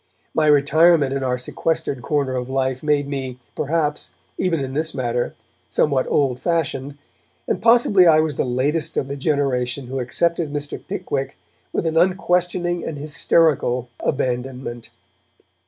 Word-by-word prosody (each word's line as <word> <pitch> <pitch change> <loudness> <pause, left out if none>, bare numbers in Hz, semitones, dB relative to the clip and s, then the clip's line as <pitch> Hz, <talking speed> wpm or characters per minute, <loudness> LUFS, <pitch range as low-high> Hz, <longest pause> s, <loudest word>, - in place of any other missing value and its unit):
My 155 -1 +2
retirement 150 0 +4
in 135 -1 -2
our 125 -1 0
sequestered 135 +1 -2
corner 140 -1 -1
of 125 0 -3
life 130 -1 -1
made 150 -2 +1
me, 135 -3 -4 0.2
perhaps, 150 0 -1 0.2
even 180 -4 0
in 130 -1 -4
this 155 +2 -1
matter, 120 -2 -2 0.3
somewhat 140 -4 +1
old 130 -4 +1
fashioned, 145 -4 -2 0.5
and - - -1
possibly 225 -5 +5
I 155 -1 +6
was 155 -2 0
the - - 0
latest 140 +5 -1
of 135 - 0
the 140 - -4
generation 135 -3 -1
who 130 +2 -4
accepted 165 +5 0
Mr. 145 -1 -4
Pickwick 135 -1 -4 0.3
with - - -2
an 160 0 0
unquestioning 175 -1 +1
and 155 - -5
hysterical 145 -4 +2
abandonment. 125 -3 -3
145 Hz, 140 wpm, -21 LUFS, 130-160 Hz, 0.5 s, I